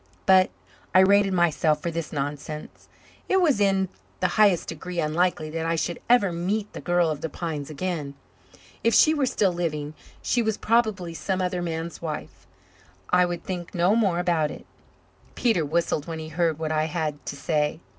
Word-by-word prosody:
But 185 -1 +6 0.5
I 185 - +9
rated 200 +1 +4
myself 160 -3 +2
for 170 +3 -3
this 165 -1 -4
nonsense. 145 +1 -5 0.4
It 380 - +4
was 305 - +3
in 195 -1 +2 0.3
the - - +1
highest 205 -5 +3
degree 175 +2 -5
unlikely 155 0 0
that 165 0 -2
I 165 - +1
should 170 +1 -2
ever 235 -6 +5
meet 195 +5 -2
the - - -7
girl 175 -2 +2
of 150 - -5
the 160 - -3
pines 150 -2 -5
again. 155 -3 -4 0.7
If 230 - +3
she 310 - +6
were 290 -4 +1
still 195 -6 +1
living 155 -4 -3 0.3
she 245 - +1
was 220 -2 0
probably 215 -7 +1
some 190 +3 -2
other 180 -1 -1
man's 165 0 -4
wife. 155 -2 -6 0.6
I 180 0 +5
would 175 -1 -4
think 180 -1 -6
no 180 +4 +3
more 200 -7 +2
about 170 -4 +1
it. - - -9 0.7
Peter 225 -9 +2
whistled 155 0 -1
when 165 -1 -4
he 160 0 -7
heard 165 -1 0
what 160 -1 -3
I 155 0 +1
had 155 -3 -3
to - - -4
say. 150 +2 -1
170 Hz, 180 wpm, -25 LUFS, 155-190 Hz, 0.7 s, I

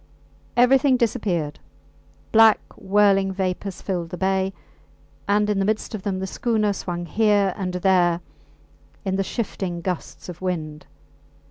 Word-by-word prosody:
Everything 260 +2 +5
disappeared; 190 - -1 0.7
black 225 -1 +6 0.2
whirling 195 -1 +3
vapours 190 0 -3
filled 175 -4 -3
the 180 - -6
bay, 190 +1 +1 0.8
and 210 +1 +2
in 210 -1 0
the - - +2
midst 215 +2 -1
of 215 - -4
them 190 -1 -2
the 190 - -3
schooner 215 +1 0
swung 175 -2 -4
here 205 +1 +2
and 185 -2 -3
there 180 -2 +3 0.9
in 190 -1 0
the 195 - +1
shifting 190 -5 -3
gusts 180 0 -5
of 180 -1 -9
wind. 155 -5 -4
195 Hz, 135 wpm, -23 LUFS, 180-210 Hz, 0.9 s, black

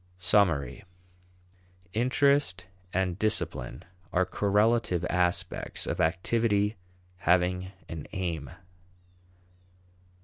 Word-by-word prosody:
Summary. 90 -8 +2 1.1
Interest 125 -5 +2 0.3
and 90 0 -1
discipline 85 - -1 0.3
are 95 +1 +2
correlative 105 -1 +2
aspects 90 0 0
of - - -1
activity 105 +5 +1 0.4
having 90 +1 +1 0.2
an 80 -3 -7
aim. 85 -7 -3
90 Hz, 70 wpm, -28 LUFS, 85-105 Hz, 1.1 s, Summary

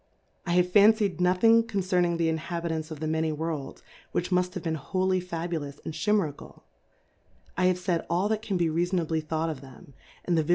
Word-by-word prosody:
I 175 - +1
have 180 0 +4
fane/ 205 +4 +7
d 210 -4 -1
nothing 185 +6 +5
concerni?ig 180 -5 0
the 165 -1 +1
Jnhalitants 160 -1 -3
of 155 -2 -7
the 160 - -3
many 160 0 0
Worlds, 155 -3 -4 0.3
which 175 +2 -1
mujtbave 180 0 0
he 165 - -1
en - - 0
wholly 185 +4 0
Fabulous 165 -5 -4
and - - -4
Chi 180 +7 -1
merical; 165 -9 -2 0.9
I 185 - +1
have 185 0 +3
f 180 - -13
aid 170 -3 +2
all 180 +4 +1
that 220 -1 0
can 210 -4 -2
he 170 -1 +2
rea 165 +2 +1
fonably 165 -3 -1
thought 160 +1 -1
of 140 -4 -8
them, 140 +3 -14 0.3
and 175 - +1
the 160 - +3
ViJio? 150 - -9
175 Hz, 210 wpm, -27 LUFS, 160-185 Hz, 0.9 s, fane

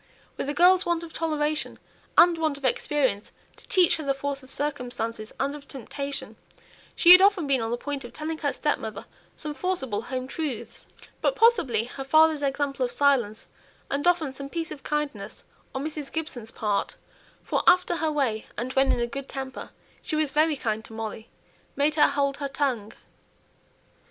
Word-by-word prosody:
With 275 - -4
a - - 0
girl's 360 +3 +6
want 340 -1 -1
of 330 - -10
toleration, 305 -2 -1 0.4
and 345 0 +7
want 310 -3 0
of 275 - -7
experience 260 -5 0 0.3
to - - -17
teach 365 -3 +4
her 315 - -5
the 275 -1 0
force 280 0 -3
of 260 - -15
circumstances, 245 -6 -1
and 275 +1 0
of 290 -1 -10
temptation, 275 +2 -6 0.6
she 345 - +7
had 365 +1 +11
often 390 -4 +4
been 270 -3 +2
on 225 - -2
the 240 - -1
point 280 +2 -4
of 240 - -9
telling 315 +1 -5
her 285 -2 0
stepmother 220 -10 -2 0.3
some 300 -2 -5
forcible 270 - -2
home 255 +2 -4
truths. 285 -3 -5 0.3
But, - - +2
possibly, 440 - +4
her 260 +3 -7
father's 310 +2 +4
example 275 -1 -1
of 245 - 0
silence, 240 -6 +1 0.5
and 285 +4 0
often 330 -6 +2
some 275 +1 -7
piece 330 +1 -4
of 280 - -8
kindness 300 0 -4 0.3
on 265 +2 -2
Mrs. 300 -2 -5
Gibson's 265 -8 -4
part 210 -2 -1 0.5
(for - - 0
after 360 -1 +5
her 320 -1 0
way, 255 -8 -1
and 250 +4 -3
when 270 0 +3
in - - +1
a - - +2
good 275 +3 -7
temper, 265 -1 -6 0.3
she - - -3
was 305 -2 +1
very 310 +1 +3
kind 220 -3 -2
to - - -12
Molly), 220 0 -6 0.5
made 290 +2 +2
her 300 - +5
hold 280 -1 0
her 280 - -3
tongue. 270 -6 -2
280 Hz, 180 wpm, -26 LUFS, 255-310 Hz, 0.6 s, had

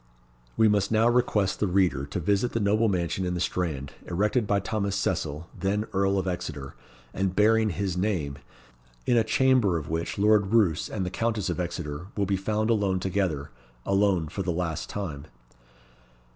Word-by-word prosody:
We 110 - +5
must 105 -1 +2
now 110 +1 +4
request 120 -5 +1
the 105 - +1
reader 90 -7 +1
to 80 - -3
visit 100 +7 +1
the 115 - 0
noble 110 +2 +2
mansion 90 0 -1
in 90 -1 -1
the - - -2
Strand, 80 -6 -2
erected 105 +5 +1
by 100 -1 +2
Thomas 100 -1 -2
Cecil, 75 -2 -2
then 100 +2 -1
Earl 100 0 +2
of 95 0 -1
Exeter, 80 -7 -4 0.4
and 95 -1 -1
bearing 110 +1 +4
his 95 -1 -2
name; 90 -8 -1 0.7
in 125 - +3
a 115 - +4
chamber 125 -6 +3
of 80 -1 -6
which 80 +1 -2
Lord 105 0 +3
Roos 95 -9 +2
and 95 - -3
the 90 - -3
Countess 110 -4 -1
of 85 - -4
Exeter 85 -2 -4
will 100 - +2
be 100 0 0
found 110 +3 0
alone 100 -4 +1
together 90 -6 -1 0.3
alone 95 -4 +2
for 95 - -5
the 90 -2 -1
last 80 -2 -3
time. 80 -8 -5
95 Hz, 175 wpm, -27 LUFS, 85-105 Hz, 0.7 s, We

